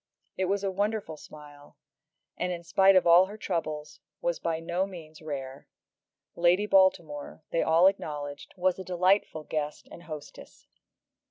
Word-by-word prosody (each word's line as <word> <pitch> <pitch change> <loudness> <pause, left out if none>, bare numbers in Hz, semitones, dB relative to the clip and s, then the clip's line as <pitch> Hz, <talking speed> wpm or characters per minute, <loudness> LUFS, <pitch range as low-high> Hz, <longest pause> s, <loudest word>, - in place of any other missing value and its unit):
It 190 - 0
was 200 +2 -1
a 195 - 0
wonderful 205 -3 -2
smile, 145 -1 -14 0.6
and, 180 0 -2
in 170 -1 -5
spite 195 +3 +4
of 185 - +5
all 175 +2 +7
her 210 +2 -9
troubles, 155 -6 -4 0.2
was - - -1
by 165 -1 -2
no 175 +3 -1
means 160 -5 -11
rare. 140 -3 -6 0.7
Lady 175 +4 +3
Baltimore, 170 -7 +2
they 165 - +1
all 165 +3 +4
acknowledged, 145 -7 -1
was 185 0 +1
a - - -5
delightful 185 -2 +1
guest 150 -1 -4
and - - -11
hostess. 155 -4 -10
170 Hz, 150 wpm, -28 LUFS, 155-190 Hz, 0.7 s, all